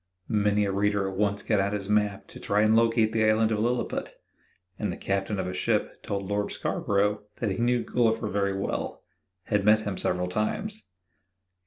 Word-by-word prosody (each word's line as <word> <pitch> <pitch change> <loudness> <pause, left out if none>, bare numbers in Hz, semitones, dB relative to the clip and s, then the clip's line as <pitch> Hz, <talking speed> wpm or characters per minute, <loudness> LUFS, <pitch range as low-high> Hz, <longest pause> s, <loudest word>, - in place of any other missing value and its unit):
Many 105 -1 +2
a 100 - -1
reader 100 0 +1
at 95 - -5
once 100 0 0
got 105 -3 +1
out 100 +1 0
his 100 -2 -3
map 105 -1 0
to - - -11
try 105 +1 +1
and 110 +1 +4
locate 115 -1 +3
the 110 -1 +1
Island 110 +1 +3
of 105 - 0
Lilliput, 120 +3 -1 0.6
and 105 -3 -1
the - - -6
captain 100 +1 -1
of 95 - -2
a 90 - -4
ship - - -1
told 100 -1 -3
Lord 100 0 -1
Scarborough 105 +1 0
that 110 -4 -2
he 95 - -3
knew 120 0 +2
Gulliver 115 -2 +1
very 100 -1 0
well 100 - -3 0.4
had 105 +2 0
met 105 +1 +5
him 100 -3 -4
several 90 0 0
times. 205 - -3
105 Hz, 190 wpm, -27 LUFS, 100-110 Hz, 0.6 s, met